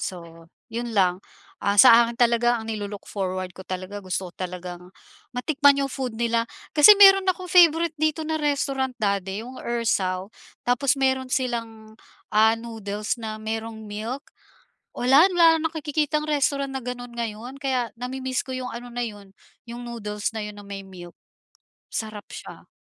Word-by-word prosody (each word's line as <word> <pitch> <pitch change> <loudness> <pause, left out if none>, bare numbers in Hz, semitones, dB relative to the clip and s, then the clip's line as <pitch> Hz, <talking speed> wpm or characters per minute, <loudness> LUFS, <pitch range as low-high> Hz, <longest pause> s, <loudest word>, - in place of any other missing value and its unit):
so 165 -2 -7 0.2
'yun 235 0 -4
lang. 180 -2 +3 0.4
Ah, 200 0 +1
sa 235 -2 +8
akin 235 0 -5
talaga 240 0 +3
ang 220 - -9
nilu-look 205 -2 -5
forward 185 -2 -3
ko 190 - -9
talaga, 185 +3 -5
gusto 185 0 -3
ko - - -33
talagang 180 -1 -7 0.4
matikman 280 +2 +3
yung 275 - -1
food 255 -5 -4
nila, 230 -1 +1 0.3
kasi 300 +7 +9
meron 390 -1 +8
ako 365 0 -5
favourite 335 -2 +5
dito 310 0 +1
na 315 0 -1
restaurant, 275 -3 -1
dati, 200 -1 -1
yung 255 +3 -9
Ersao. 195 -5 -1 0.4
Tapos 250 +2 +2
meron 265 -1 +1
silang, 230 -4 -3 0.4
ah, 220 +1 +5
noodles 215 -2 -4
na 215 -1 -5
merong 220 0 -5
milk, 220 +6 -5 0.7
wala 265 +5 +5
wala 330 -2 +5
nakikitang 305 -1 -1
restaurant 280 -2 0
na 265 - -4
ganun 245 -1 -7
ngayon, 235 +2 -5
kaya 255 -3 0
nami-miss 255 +2 -3
ko 260 - -11
yung 255 -1 -4
ano 245 +1 -8
na 240 0 -3
'yon, 205 -3 -10 0.4
yung 240 0 -7
noodles 210 -2 -4
na 220 - -3
'yon, 210 0 -8
na 205 - -11
may 200 -1 -7
milk, 175 -2 -12 0.8
sarap 215 -2 -5
siya. - - -10
235 Hz, 160 wpm, -24 LUFS, 205-265 Hz, 0.8 s, kasi